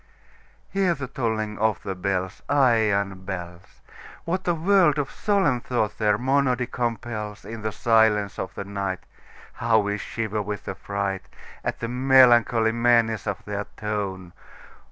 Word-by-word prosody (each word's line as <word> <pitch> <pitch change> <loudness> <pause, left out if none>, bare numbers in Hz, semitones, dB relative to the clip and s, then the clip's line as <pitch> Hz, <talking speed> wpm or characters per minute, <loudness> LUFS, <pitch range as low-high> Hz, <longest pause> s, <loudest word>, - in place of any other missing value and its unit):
Hear 190 -3 +2
the 140 -2 -5
tolling 110 -5 -2
of 110 -1 +1
the 95 - -3
bells, 95 0 -2
Iron 105 -8 +2
bells! 90 -2 -8 0.4
What 185 +3 -2
a 175 - +3
world 170 -2 +4
of 145 -2 -2
solemn 190 - +1
thought 115 -4 -2
their 105 -1 +3
monody 130 0 +1
compels! 115 -3 -4
In 115 0 -7
the 110 0 -2
silence 110 -2 +2
of - - -4
the - - -4
nightHow 100 +3 -3
we 100 0 -2
shiver 110 0 -3
with 105 0 -5
affrightAt 95 +1 -5
the 115 - -4
melancholy 120 -3 +5
menace 115 -3 +2
of 100 - -4
their 105 0 -4
tone! 100 -4 -4
110 Hz, 135 wpm, -24 LUFS, 100-125 Hz, 0.4 s, melancholy